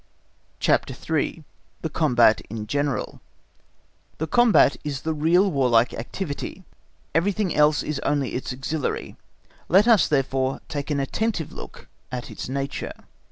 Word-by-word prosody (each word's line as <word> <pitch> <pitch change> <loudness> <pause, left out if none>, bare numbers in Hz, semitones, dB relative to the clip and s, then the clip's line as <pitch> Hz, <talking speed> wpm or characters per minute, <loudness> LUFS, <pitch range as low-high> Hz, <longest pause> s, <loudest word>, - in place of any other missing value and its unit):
CHAPTER 130 - +1
III. 160 +3 -2 0.4
The 160 - -1
Combat 120 -9 +4
in 110 0 -5
General 145 +3 -2 1.0
The 160 - -2
Combat 225 - +5
is 140 -3 -4
the 160 - -1
real 170 +6 +3
warlike 125 -5 +3
activity, 150 +8 -5 0.5
everything 190 +2 +1
else 150 0 +4
is 150 -2 -3
only 140 -3 -1
its 125 - -3
auxiliary; 135 +4 -3 0.5
let 195 +6 +5
us 220 -8 +6
therefore 135 -2 0
take 145 -1 -4
an 145 -2 0
attentive 165 +4 -2
look - - -10 0.2
at 125 -1 -5
its - - -6
nature. 140 +1 -3
145 Hz, 130 wpm, -24 LUFS, 135-165 Hz, 1.0 s, us